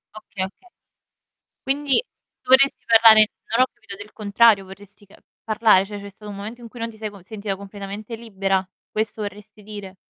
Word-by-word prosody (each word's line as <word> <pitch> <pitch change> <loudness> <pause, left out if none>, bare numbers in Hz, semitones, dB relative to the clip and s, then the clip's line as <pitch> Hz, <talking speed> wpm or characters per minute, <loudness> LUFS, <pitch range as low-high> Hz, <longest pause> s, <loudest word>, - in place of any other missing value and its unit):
Okay, 215 -2 -6
okay. 365 - -15 0.9
Quindi 280 - +2 0.4
dovresti 270 +1 +4
parlare 220 -1 +7 0.3
non - - +2
ho - - +4
capito 225 -5 -11
del 205 +1 -11
contrario, 210 -1 +3
vorresti 200 +1 -15
ca 195 - -19 0.3
parlare? 215 -3 +4
Cioè, 205 0 -7
c'è 200 - -9
stato 210 +1 -11
un 200 - -8
momento 220 +5 -8
in 235 - -10
cui 240 +1 -12
non 230 0 -3
ti 220 - -15
sei 215 -1 -5
con 200 -3 -14
sentita 200 0 -5
completamente 200 +3 -8
libera, 195 -4 -1 0.2
questo 215 0 -3
vorresti 210 +1 -9
dire? 205 -2 -9
210 Hz, 180 wpm, -22 LUFS, 200-225 Hz, 0.9 s, parlare